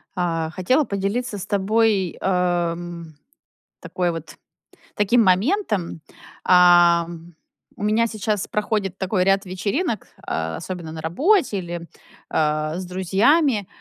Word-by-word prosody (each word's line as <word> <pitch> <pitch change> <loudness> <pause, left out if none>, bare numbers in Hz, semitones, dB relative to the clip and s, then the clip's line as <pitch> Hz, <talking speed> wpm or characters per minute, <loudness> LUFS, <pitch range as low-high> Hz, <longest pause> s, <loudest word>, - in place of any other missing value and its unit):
А, 165 -3 -1
хотела 255 - +1
поделиться 205 +3 -2
с 190 - -6
тобой, 200 -2 +1
а, 175 -2 +1
м, 170 -2 -9 0.7
такой 180 -1 -2
вот 165 -1 -8 0.6
таким 225 +3 +3
моментом. 200 - 0 0.4
А, 175 -1 +6 0.7
у - - -6
меня 220 +2 +2
сейчас 215 -2 -2
проходит 205 -3 -2
такой 190 -1 0
ряд 195 +1 +2
вечеринок, 210 - -2 0.2
а, 80 0 -3
особенно 175 - -6
на 160 0 -7
работе 270 - +2
или, 175 -1 -6 0.4
а, 155 +1 0
с 185 - -5
друзьями. 200 - +2
185 Hz, 115 wpm, -22 LUFS, 175-215 Hz, 0.7 s, А